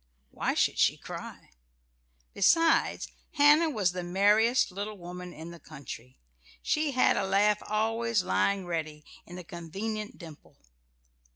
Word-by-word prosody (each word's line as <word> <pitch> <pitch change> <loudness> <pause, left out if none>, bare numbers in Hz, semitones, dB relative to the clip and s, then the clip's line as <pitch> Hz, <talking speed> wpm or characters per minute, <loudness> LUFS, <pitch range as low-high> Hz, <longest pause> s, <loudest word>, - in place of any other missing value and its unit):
Why - - -2
should - - +1
she - - +3
cry? - - -9 0.8
Besides, 330 0 +3 0.3
Hannah 300 +2 +5
was 205 - 0
the 180 0 -4
merriest 205 +7 +3
little 205 +3 -5
woman 180 0 -8
in 165 0 -9
the 170 - -11
country. 130 -5 -10 0.5
She 305 -2 0
had 255 - +3
a 195 - 0
laugh 205 +2 +2
always 225 0 0
lying 180 - 0
ready 155 -3 -4 0.2
in 175 - -9
a 180 - -8
convenient 205 +8 -6
dimple. 160 -5 -13
195 Hz, 130 wpm, -29 LUFS, 170-225 Hz, 0.8 s, Hannah